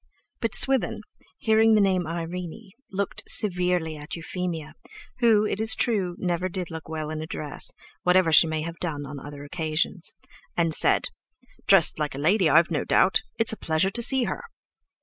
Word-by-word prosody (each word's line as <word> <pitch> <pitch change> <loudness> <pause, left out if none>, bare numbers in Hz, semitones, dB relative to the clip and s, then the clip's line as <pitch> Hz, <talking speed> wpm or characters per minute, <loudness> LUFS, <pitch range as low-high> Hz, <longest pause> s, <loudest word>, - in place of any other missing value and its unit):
But 230 - -1
Swithin, 260 -8 +3 0.4
hearing 220 -2 +3
the - - +4
name 185 -4 +1
Irene, 175 +4 -6 0.2
looked 195 0 -3
severely 180 -5 +2
at 150 +2 -8
Euphemia, 170 -2 -5 0.5
who, 225 -3 +3
it 210 - -2
is 220 0 +5
true, 195 -7 0
never 180 0 -2
did 180 -2 -5
look 160 -1 -8
well 155 -1 -5
in 155 0 -5
a 160 - -6
dress, 150 -3 -2 0.3
whatever 180 -2 +3
she 160 +2 +6
may 155 -1 -3
have 165 +1 -7
done 150 -5 -4
on 140 0 -8
other 145 +1 -10
occasions, 160 +2 -3 0.4
and 165 -2 +1
said: - - +3 0.6
"Dressed 190 -5 +4
like 150 -3 -3
a - - -7
lady, 175 +4 +2
I've 170 +2 +4
no 150 - -1
doubt. 190 - +2 0.2
It's 225 -1 +8
a - - -6
pleasure 160 +4 0
to 235 - -1
see 260 +2 +4
her." - - -4
175 Hz, 175 wpm, -25 LUFS, 160-195 Hz, 0.6 s, It's